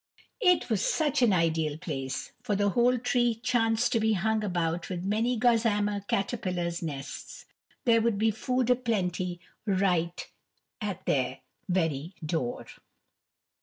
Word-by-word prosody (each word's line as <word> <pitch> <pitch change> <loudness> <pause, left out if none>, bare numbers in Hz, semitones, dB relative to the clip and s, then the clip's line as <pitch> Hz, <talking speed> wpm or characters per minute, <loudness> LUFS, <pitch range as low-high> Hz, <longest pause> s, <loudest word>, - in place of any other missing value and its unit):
It 360 -5 +4
was 220 -4 0
such 295 -4 +1
an 240 -4 +5
ideal 160 -4 +1
place, 135 -6 -4
for 215 -5 -1
the 205 0 +2
whole 245 +5 +3
tree 240 -1 +1
chanced 225 0 +1
to 230 - +2
be 220 0 +2
hung 215 +3 +1
about 175 -3 -1
with 180 -2 -4
many 225 +5 +1
gossamer 220 -3 +2
caterpillars' 180 -5 -1
nests; 145 -4 -6 0.4
there 230 -2 +5
would 225 -2 +1
be 220 +2 +3
food 250 +3 0
a - - +6
plenty 185 -7 -1 0.3
right 180 -3 +1 0.5
at 205 -4 -4
their 130 -3 0 0.3
very 165 -2 0
door. 150 -6 -2
205 Hz, 135 wpm, -28 LUFS, 175-230 Hz, 0.5 s, a